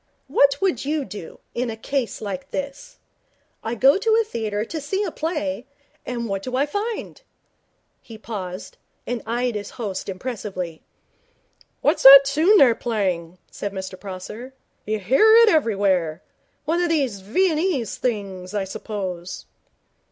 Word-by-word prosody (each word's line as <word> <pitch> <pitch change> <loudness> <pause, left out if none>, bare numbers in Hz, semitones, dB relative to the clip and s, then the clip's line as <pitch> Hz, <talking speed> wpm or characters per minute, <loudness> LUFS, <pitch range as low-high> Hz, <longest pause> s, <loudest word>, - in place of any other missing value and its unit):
What 280 +1 +3
would 375 -11 +1
you 295 0 -1
do 195 -4 -9
in 245 0 -2
a 220 - -5
case 255 +1 -2
like 270 +7 -5
this? 280 - -6 0.7
I 225 +2 -2
go 270 - +5
to 445 +1 +3
a - - +3
theatre 220 - -3
to 315 +5 -5
see 385 +8 -1
a - - -3
play, 255 - -3 0.4
and 235 -2 -3
what 195 -2 -2
do 255 +4 -4
I 275 +2 +2
find?' 420 +11 -4 0.8
He 225 - -11
paused, 195 -4 -7 0.3
and 245 -2 -3
eyed 240 +1 0
his 205 -1 -5
host 200 -5 -4
impressively. 190 -5 -5 1.0
'What's - - +2
that 275 +1 +11
tune 315 +9 +4
they're 260 -9 +7
playing?' 185 -8 -2
said 200 -1 -5
Mr 190 -1 -5
Prosser. 210 +7 -8 0.3
'You 215 0 0
hear 270 - +5
it 455 - +6
everywhere. 195 - +1 0.4
One 335 +3 +1
of 350 - +1
these 270 -11 0
Viennese 310 - 0
things, 200 -5 -3
I 205 - 0
suppose.' 190 -3 -6
235 Hz, 145 wpm, -23 LUFS, 195-285 Hz, 1.0 s, that